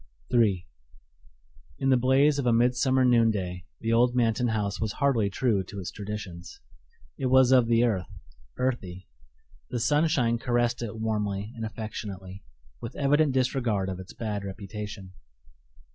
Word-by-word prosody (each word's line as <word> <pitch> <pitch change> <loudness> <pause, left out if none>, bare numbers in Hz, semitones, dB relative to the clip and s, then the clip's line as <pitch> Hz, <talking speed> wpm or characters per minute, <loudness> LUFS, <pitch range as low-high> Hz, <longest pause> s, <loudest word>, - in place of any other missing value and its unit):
III 105 -7 +2 1.1
In 135 - 0
the 130 - +6
blaze 135 +4 +3
of 130 - -1
a - - +4
midsummer 125 +2 +3
noonday 105 -7 +1 0.2
the 115 0 0
old 120 +1 +3
Manton 120 0 +2
house 105 -3 -2
was 110 -2 -1
hardly 130 -8 +1
true 100 -1 0
to 100 - -8
its 90 - -5
traditions. 100 -5 -7 0.6
It 130 - 0
was 130 0 +5
of 125 -3 +5
the 115 0 +3
earth, 100 -7 0 0.5
earthy. 95 -8 -3 0.6
The 120 - -2
sunshine 140 -4 +2
caressed 120 0 0
it 110 -2 -5
warmly 105 -1 -2
and 115 - -6
affectionately, 100 -4 -7 0.4
with - - -7
evident 145 0 +2
disregard 125 -7 0
of 95 -1 -5
its 95 -1 -10
bad 105 -3 -4
reputation. 100 -1 -7
115 Hz, 145 wpm, -27 LUFS, 100-125 Hz, 1.1 s, the